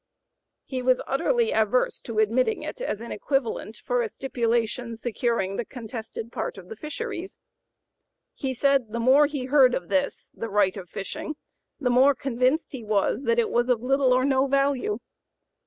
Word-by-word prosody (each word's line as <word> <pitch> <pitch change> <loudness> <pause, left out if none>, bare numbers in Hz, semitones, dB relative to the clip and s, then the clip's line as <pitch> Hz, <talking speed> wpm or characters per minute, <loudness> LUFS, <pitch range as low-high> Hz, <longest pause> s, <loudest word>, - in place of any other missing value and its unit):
He 260 -2 -3
was 255 0 +3
utterly 465 - +1
averse 220 +3 +1
to 230 -2 -6
admitting 230 - +2
it - - -6
as 225 - -2
an 235 - -7
equivalent 230 -2 -2
for 245 +2 -1
a 225 - -2
stipulation 235 -1 -1
securing 225 -4 -1
the - - -1
contested 225 -1 -7
part - - -4
of 180 -1 -11
the - - -6
fisheries. 365 - -5 1.0
He 265 -1 -3
said 270 -4 +2
the 235 - -1
more 265 +5 +5
he 285 -3 -4
heard 260 -2 +5
of 175 -1 -5
this 190 -2 -1
[the 230 - -5
right 200 -2 +2
of 185 -4 -8
fishing], 195 - -5 0.4
the 250 -4 +1
more 265 +3 +5
convinced 260 +4 0
he 260 -4 -7
was 215 +4 0
that 230 0 +2
it 235 - +2
was 240 +1 +1
of 240 -2 +2
little 270 0 +3
or 255 +1 +4
no 270 0 +3
value. 275 -5 +1
245 Hz, 170 wpm, -26 LUFS, 220-270 Hz, 1.0 s, more